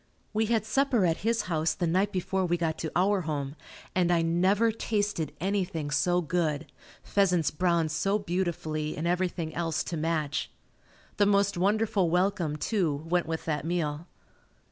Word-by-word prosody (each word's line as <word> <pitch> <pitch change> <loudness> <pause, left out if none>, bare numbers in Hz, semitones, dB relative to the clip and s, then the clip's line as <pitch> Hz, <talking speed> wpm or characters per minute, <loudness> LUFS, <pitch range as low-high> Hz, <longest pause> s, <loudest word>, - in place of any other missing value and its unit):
We 220 +1 +1
had 225 -2 +1
supper 240 -2 +2
at 165 -2 +2
his 230 0 0
house 160 -4 0
the 175 - -1
night 190 +5 +1
before 190 +1 -1
we 175 -1 +1
got 165 -2 -1
to 160 - -3
our 195 +2 +3
home, 145 -3 -3 0.4
and 180 -1 +2
I 170 -1 +3
never 190 +7 +3
tasted 205 -8 -1
anything 180 -5 -1
so 175 +4 +2
good 160 -3 -1 0.4
pheasants 180 -6 +2
browned 170 -1 +1
so 195 +7 +1
beautifully 170 -5 -2
and 155 - -3
everything 175 -2 -1
else 165 -2 -1
to 170 - -4
match. 155 -2 -1 0.7
The 205 - +4
most 200 0 +3
wonderful 205 0 +2
welcome, 180 -3 +1
too, 155 -4 -1
went 175 -1 +1
with 160 0 -3
that 150 -3 -1
meal. 165 -1 -2
175 Hz, 160 wpm, -28 LUFS, 160-200 Hz, 0.7 s, The